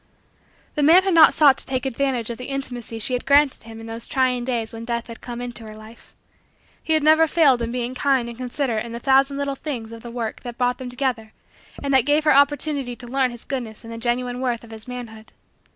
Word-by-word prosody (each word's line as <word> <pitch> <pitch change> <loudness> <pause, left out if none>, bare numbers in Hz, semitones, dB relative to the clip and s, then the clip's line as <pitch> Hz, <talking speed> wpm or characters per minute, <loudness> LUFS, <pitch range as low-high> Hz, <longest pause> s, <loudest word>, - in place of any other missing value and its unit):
The 300 - -1
man 330 +6 +6
had 385 -1 +1
not 325 -1 +8
sought 285 -4 +5
to - - -9
take 260 0 -2
advantage 255 -3 -1
of 235 - -7
the 250 - -6
intimacy 245 -4 -5
she 225 +3 -1
had 250 - -1
granted 280 -4 +4
him 225 0 -10
in 225 - -9
those 225 +1 -7
trying 255 -2 +1
days 235 -3 -2
when 225 0 -7
Death 235 0 -3
had 230 -1 -11
come 240 -1 -7
into 240 -1 -6
her 215 - -10
life. 215 +2 -15 0.7
He 320 - 0
had 310 -1 +2
never 315 +1 +5
failed 290 -7 +4
in 230 0 -2
being 245 0 -3
kind 265 -2 +1
and 235 - -7
considerate 250 -2 -2
in 235 -1 -8
the 235 - -5
thousand 270 +2 +3
little 280 0 -1
things 255 -6 -6
of 230 0 -9
the 235 - -9
work 235 -2 -4
that 240 -1 -8
brought 245 0 0
them 255 -1 -6
together 245 -4 -3 0.5
and 280 -1 -1
that 265 0 +4
gave 295 +1 +3
her 300 - +5
opportunity 280 -2 +2
to 245 0 -10
learn 260 +1 +1
his 240 -1 -11
goodness 240 -5 -5
and 230 0 -8
the 230 - -7
genuine 245 +1 -1
worth 240 -3 -1
of 230 - -13
his 220 +1 -10
manhood. 225 -3 -9
250 Hz, 240 wpm, -22 LUFS, 235-275 Hz, 0.7 s, not